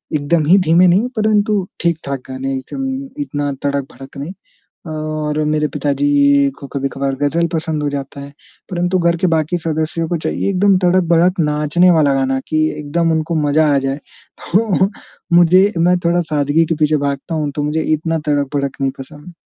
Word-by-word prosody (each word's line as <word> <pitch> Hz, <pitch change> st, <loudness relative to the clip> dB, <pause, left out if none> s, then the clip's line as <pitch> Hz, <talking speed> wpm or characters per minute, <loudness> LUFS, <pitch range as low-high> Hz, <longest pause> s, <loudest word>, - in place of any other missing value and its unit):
एकदम 150 Hz, +2 st, +1 dB
ही 180 Hz, +6 st, +5 dB
धीमे 165 Hz, +3 st, +5 dB
नहीं 190 Hz, +7 st, +3 dB
परंतु 215 Hz, -1 st, +2 dB, 0.3 s
ठीक-ठाक 160 Hz, -5 st, -2 dB
गाने 130 Hz, +1 st, -4 dB
एकदम 265 Hz, -, -5 dB
इतना 145 Hz, -, -3 dB
तड़क-भड़क 140 Hz, -1 st, -4 dB
नहीं। 145 Hz, +6 st, -6 dB, 0.6 s
और 155 Hz, -1 st, -3 dB
मेरे 150 Hz, 0 st, +1 dB
पिताजी 140 Hz, -1 st, +2 dB
को 140 Hz, -, -9 dB
कभी-कभार 135 Hz, 0 st, -2 dB
गज़ल 165 Hz, +4 st, +1 dB
पसंद 160 Hz, -1 st, -2 dB
हो 145 Hz, -, 0 dB
जाता 140 Hz, 0 st, -6 dB
है। 140 Hz, 0 st, -10 dB, 0.4 s
परंतु 180 Hz, +1 st, 0 dB
घर 170 Hz, -1 st, +2 dB
के -, -, +4 dB
बाकी 160 Hz, +2 st, 0 dB
सदस्यों 160 Hz, 0 st, -2 dB
को 175 Hz, -, -1 dB
चाहिए 160 Hz, -, -2 dB
एकदम 195 Hz, +1 st, +3 dB
तड़क-भड़क 175 Hz, 0 st, +3 dB
नाचने 150 Hz, +3 st, +2 dB
वाला 155 Hz, -5 st, +3 dB
गाना 135 Hz, 0 st, 0 dB
कि 155 Hz, -, 0 dB, 0.2 s
एकदम 165 Hz, +3 st, 0 dB
उनको 160 Hz, +1 st, -1 dB
मज़ा 155 Hz, +2 st, +3 dB
आ -, -, +3 dB
जाए। 135 Hz, 0 st, -2 dB, 0.6 s
तो 195 Hz, -1 st, +2 dB, 0.5 s
मुझे 185 Hz, +4 st, +5 dB
मैं 180 Hz, +2 st, +3 dB
थोड़ा 170 Hz, +1 st, +2 dB
सादगी 145 Hz, +2 st, +2 dB
के 165 Hz, -, 0 dB
पीछे 155 Hz, 0 st, +2 dB
भागता 140 Hz, +3 st, -3 dB
हूँ 150 Hz, -2 st, -1 dB
तो 150 Hz, -, -1 dB
मुझे 150 Hz, +2 st, -1 dB
इतना 165 Hz, +1 st, -2 dB
तड़क-भड़क 140 Hz, -1 st, -1 dB
नहीं 135 Hz, -1 st, +1 dB
पसंद। 145 Hz, +5 st, -11 dB
155 Hz, 165 wpm, -17 LUFS, 145-175 Hz, 0.6 s, ही